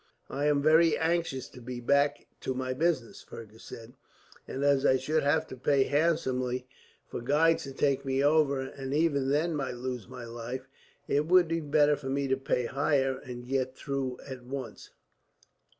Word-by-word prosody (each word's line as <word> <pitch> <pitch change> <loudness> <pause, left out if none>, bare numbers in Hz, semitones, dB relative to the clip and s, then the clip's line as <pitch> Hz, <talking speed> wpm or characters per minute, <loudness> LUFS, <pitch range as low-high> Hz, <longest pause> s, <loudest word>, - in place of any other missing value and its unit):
"I 140 +2 -1
am 145 -1 +2
very 160 +1 +5
anxious 165 -5 -1
to 125 - -13
be 125 +1 -6
back 140 +4 +2
to 130 - -3
my 130 0 -2
business," 140 -4 -1
Fergus 110 0 -12
said; 115 +1 -10 0.5
"and 135 - -4
as 140 -1 +3
I 130 -2 +4
should 155 +4 0
have 150 +3 +2
to - - -7
pay 135 +2 +2
handsomely 130 -5 0 0.4
for - - -6
guides 150 +6 +2
to 135 - -7
take 135 0 +1
me 135 0 0
over, 145 -2 +3
and 135 +1 -5
even 145 -4 +2
then 155 +4 +1
might 135 -4 -3
lose 125 -2 -5
my 125 -1 -9
life, 120 +3 -6 0.4
it 145 +2 +1
would 180 0 +5
be 165 +1 -1
better 150 0 +3
for 135 -2 -7
me 140 +1 0
to 130 - +3
pay 130 -2 -1
higher 135 0 +1
and 125 -1 -8
get 130 0 -1
through 135 -3 -3
at 130 -2 -8
once." 130 -3 -7
135 Hz, 180 wpm, -29 LUFS, 130-150 Hz, 0.5 s, very